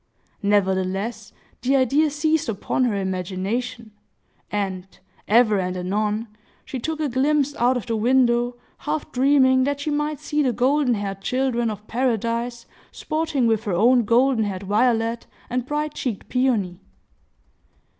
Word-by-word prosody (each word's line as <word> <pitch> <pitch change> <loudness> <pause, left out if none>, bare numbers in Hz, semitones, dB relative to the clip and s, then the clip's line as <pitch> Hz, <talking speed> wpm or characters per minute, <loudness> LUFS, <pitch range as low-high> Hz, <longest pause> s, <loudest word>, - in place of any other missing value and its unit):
Nevertheless, 200 +2 0 0.3
the 260 +3 +2
idea 275 +4 +3
seized 305 -1 0
upon 225 +4 0
her 230 -4 0
imagination; 200 +5 -3 0.6
and, 195 -3 -2 0.4
ever 215 -2 +4
and 185 0 -2
anon, 210 +4 -1 0.4
she 260 - -5
took 315 +5 -3
a 305 - 0
glimpse 285 +2 +1
out 245 +2 +3
of 240 - -5
the 230 -2 -2
window, 240 +1 +2 0.2
half 300 0 -3
dreaming 260 0 +4
that 285 0 -2
she 300 - -2
might 295 0 -1
see 300 0 -1
the 260 -4 +1
golden 255 +1 +2
haired 195 -2 -4
children 250 0 0
of 210 -1 -7
paradise 235 0 -1 0.3
sporting 310 -5 -1
with 225 0 +1
her 200 - -1
own 240 +7 +4
golden 235 +1 +3
haired 195 -1 -4
Violet 230 +2 +1 0.2
and 250 0 -2
bright 300 +1 -2
cheeked 235 -7 -4
Peony. 225 -9 0
240 Hz, 140 wpm, -23 LUFS, 210-265 Hz, 0.6 s, ever